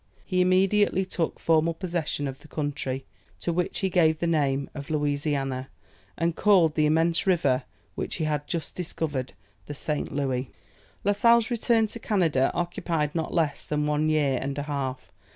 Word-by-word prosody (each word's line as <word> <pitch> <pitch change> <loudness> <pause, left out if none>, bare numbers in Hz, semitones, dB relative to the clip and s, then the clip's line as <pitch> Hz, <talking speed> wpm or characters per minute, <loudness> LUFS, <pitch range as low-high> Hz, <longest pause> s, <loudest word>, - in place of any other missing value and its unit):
He 185 -2 +1
immediately 190 +1 +3
took 175 -3 -2
formal 165 0 +2
possession 165 -5 -2
of 135 0 -6
the - - -16
country, 145 -3 -3 0.3
to 170 - -1
which 180 +1 -1
he 190 - +1
gave 160 -3 +4
the 170 - -2
name 140 -4 +1
of 140 -1 -7
Louisiana, 145 -3 -1 0.5
and 170 -1 0
called 185 -7 +4
the 155 -1 +3
immense 165 +4 +2
river 140 -8 +2 0.3
which - - -3
he 165 - -2
had 150 -1 -1
just 165 -2 -4
discovered 150 -7 -3 0.3
the 145 - -5
St. 150 +1 -2
Louis. 130 -3 -1 0.5
La 205 - +3
Sale's 230 +3 +4
return 230 -1 +3
to 215 +2 -7
Canada 165 -12 +2
occupied 165 -3 -1
not 160 -2 -2
less 155 -4 0
than 150 0 -1
one 150 +1 +1
year 145 -4 +2
and 140 +1 -3
a 145 - -2
half. 135 -3 -4
155 Hz, 170 wpm, -26 LUFS, 145-175 Hz, 0.5 s, gave